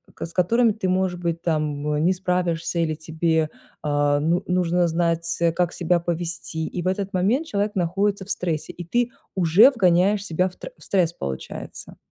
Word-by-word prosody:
к -, -, -5 dB
с 165 Hz, -, -11 dB
которыми 225 Hz, +6 st, +3 dB
ты, 205 Hz, -3 st, -3 dB
может 185 Hz, -1 st, 0 dB
быть, 170 Hz, -1 st, -2 dB
там, 150 Hz, -3 st, -1 dB
э, -, -, 0 dB
не 175 Hz, +4 st, +3 dB
справишься 180 Hz, -2 st, -1 dB
или 165 Hz, -2 st, +1 dB
тебе, 160 Hz, 0 st, 0 dB, 0.3 s
а, 145 Hz, -1 st, +2 dB
ну 165 Hz, +4 st, +1 dB
нужно 180 Hz, -1 st, +2 dB
знать, 165 Hz, 0 st, 0 dB, 0.2 s
как 175 Hz, -1 st, +1 dB
себя 175 Hz, 0 st, +1 dB
повести, 170 Hz, -1 st, -3 dB
и 180 Hz, -, -4 dB
в -, -, -2 dB
этот 195 Hz, +1 st, -1 dB
момент 225 Hz, -, +1 dB
человек 205 Hz, -2 st, -1 dB
находится 195 Hz, +3 st, 0 dB
в -, -, -17 dB
стрессе, 165 Hz, -4 st, -2 dB
и 175 Hz, -, -7 dB
ты 240 Hz, +6 st, +1 dB, 0.3 s
уже 185 Hz, -, +6 dB
вгоняешь 195 Hz, -2 st, +3 dB
себя 180 Hz, 0 st, +1 dB
в 180 Hz, -, -19 dB
тр -, -, -8 dB
стресс, 180 Hz, -4 st, +1 dB
получается. 65 Hz, -, -7 dB
175 Hz, 180 wpm, -23 LUFS, 165-190 Hz, 0.3 s, уже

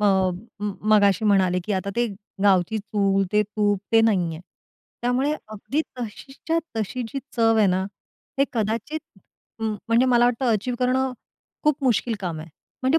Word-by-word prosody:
अ, -, -, +1 dB, 0.6 s
म 205 Hz, -1 st, -1 dB, 0.2 s
मगाशी 200 Hz, 0 st, +4 dB
म्हणाले, 190 Hz, -3 st, +3 dB
की 210 Hz, -, -2 dB
आता 195 Hz, +1 st, -1 dB
ते 240 Hz, 0 st, +2 dB, 0.4 s
गावची 195 Hz, +1 st, +3 dB
चूल, 200 Hz, -2 st, +1 dB
ते 210 Hz, 0 st, +4 dB
तूप, 205 Hz, -1 st, 0 dB
ते 225 Hz, -, +7 dB
नाहीये. 180 Hz, -8 st, +1 dB, 0.6 s
त्यामुळे 255 Hz, +4 st, +1 dB, 0.2 s
अगदी 215 Hz, +8 st, -2 dB, 0.2 s
तशीच्या 270 Hz, +8 st, -3 dB, 0.2 s
तशी 225 Hz, +4 st, -2 dB
जी 275 Hz, -, -4 dB, 0.2 s
चव 225 Hz, -1 st, +4 dB
आहे 215 Hz, -2 st, +5 dB
ना, 185 Hz, 0 st, +2 dB, 0.6 s
हे 275 Hz, -, +5 dB
कदाचित, 230 Hz, +6 st, -2 dB, 0.6 s
म 220 Hz, -1 st, 0 dB, 0.2 s
म्हणजे 235 Hz, +3 st, +4 dB
मला 240 Hz, -1 st, +5 dB
वाटतं, 245 Hz, +2 st, +1 dB
अचीव्ह 225 Hz, +4 st, -1 dB
करणं 260 Hz, +1 st, +1 dB, 0.5 s
खूप 300 Hz, -2 st, +2 dB
मुश्किल 240 Hz, -1 st, +2 dB
काम 175 Hz, -5 st, -3 dB
आहे. 160 Hz, -, -9 dB, 0.3 s
म्हणजे 265 Hz, +5 st, +3 dB
220 Hz, 155 wpm, -24 LUFS, 200-250 Hz, 0.6 s, ते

